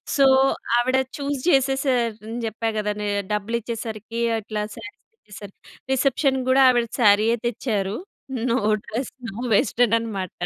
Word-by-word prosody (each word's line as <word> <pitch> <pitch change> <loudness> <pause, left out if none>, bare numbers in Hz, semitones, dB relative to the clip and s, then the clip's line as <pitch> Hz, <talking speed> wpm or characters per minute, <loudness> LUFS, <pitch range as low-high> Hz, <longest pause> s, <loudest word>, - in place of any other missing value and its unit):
So, 275 - +5 0.5
ఆవిడ 255 +2 +2 0.2
choose 285 0 -2
చేసేసారు 265 -4 +2
అని 230 +2 -5
చెప్పా 225 +1 -2
గదా! 210 0 -1
నే 210 - -2 0.3
డబ్బులు 210 +3 -1
ఇచ్చేసరికి, 230 0 -5 0.2
అట్లా 215 0 -4
సారీస్ 230 +3 -11
తెచ్చేసారు. 205 - -12 0.4
రిసెప్షన్ 265 0 +1
కూడా, 265 +1 +5
ఆవిడ 240 -2 +2
సారీయే 215 +2 +4
తెచ్చారు. 210 -4 -2 0.5
నో 240 +2 +2 0.3
డ్రెస్, 240 +4 -4 0.2
నో - - -12 0.2
వెస్టర్న్ 230 +2 +3
అనమాట. 200 -6 -4
230 Hz, 130 wpm, -23 LUFS, 210-260 Hz, 0.5 s, So